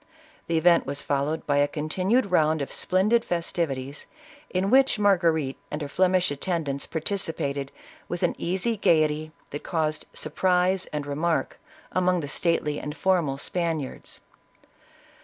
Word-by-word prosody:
The 165 Hz, -, +1 dB
event 170 Hz, -1 st, +4 dB
was 140 Hz, +1 st, -3 dB
followed 145 Hz, +3 st, -1 dB
by 145 Hz, -1 st, +1 dB
a 145 Hz, 0 st, +4 dB
continued 185 Hz, -, 0 dB
round 155 Hz, -3 st, +3 dB
of -, -, -7 dB
splendid 210 Hz, +6 st, +2 dB
festivities, 155 Hz, -, -3 dB, 0.4 s
in 190 Hz, +2 st, 0 dB
which 265 Hz, -1 st, +5 dB
Margarite 170 Hz, -9 st, +2 dB
and 150 Hz, -, -4 dB
her -, -, -3 dB
Flemish 185 Hz, +2 st, +2 dB
attendants 145 Hz, -2 st, -2 dB
participated, 155 Hz, -5 st, -2 dB, 0.4 s
with 175 Hz, -, -3 dB
an -, -, +2 dB
easy 190 Hz, +6 st, -1 dB
gaiety 155 Hz, -4 st, +2 dB, 0.2 s
that 145 Hz, -, -5 dB
caused 155 Hz, -3 st, -2 dB
surprise 185 Hz, 0 st, +1 dB
and 150 Hz, -1 st, -4 dB
remark 155 Hz, +4 st, -1 dB, 0.3 s
among 180 Hz, -1 st, +2 dB
the 145 Hz, -, -5 dB
stately 150 Hz, -1 st, 0 dB
and 150 Hz, +1 st, -6 dB
formal 170 Hz, -8 st, +1 dB
Spaniards. 165 Hz, -2 st, -3 dB
165 Hz, 135 wpm, -26 LUFS, 145-185 Hz, 0.4 s, which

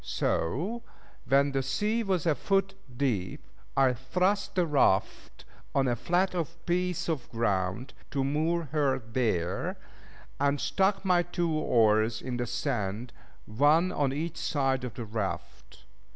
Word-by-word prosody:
So 170 Hz, -, -1 dB, 0.5 s
when 140 Hz, +2 st, +4 dB
the 135 Hz, 0 st, 0 dB
sea 210 Hz, -, 0 dB
was 190 Hz, -6 st, 0 dB
a 165 Hz, -, +4 dB
foot 195 Hz, +4 st, 0 dB, 0.2 s
deep, 110 Hz, -10 st, -1 dB, 0.3 s
I 135 Hz, -2 st, +5 dB
thrust 180 Hz, +11 st, 0 dB
the 180 Hz, -2 st, +3 dB
raft 140 Hz, -11 st, +1 dB, 0.3 s
on 135 Hz, -1 st, +3 dB
a 120 Hz, -, +1 dB
flat 180 Hz, +9 st, +1 dB, 0.3 s
piece 180 Hz, 0 st, 0 dB
of 155 Hz, -7 st, -2 dB
ground, 105 Hz, +1 st, -1 dB, 0.2 s
to 140 Hz, -2 st, -1 dB
moor 160 Hz, +5 st, 0 dB
her 145 Hz, -4 st, +2 dB
there, 110 Hz, -7 st, -1 dB, 0.6 s
and 140 Hz, 0 st, +2 dB
stuck 190 Hz, +8 st, +1 dB
my 180 Hz, -2 st, +4 dB
two 175 Hz, -1 st, -2 dB
oars 110 Hz, -6 st, +3 dB
in 125 Hz, -2 st, -4 dB
the 120 Hz, 0 st, -2 dB
sand, 115 Hz, 0 st, -2 dB, 0.3 s
one 150 Hz, +10 st, +3 dB
on 145 Hz, -6 st, 0 dB
each 160 Hz, +4 st, -3 dB
side 135 Hz, -5 st, 0 dB
of 125 Hz, -4 st, -5 dB
the 120 Hz, -, -5 dB
raft. 105 Hz, -2 st, -5 dB
140 Hz, 135 wpm, -29 LUFS, 120-170 Hz, 0.6 s, I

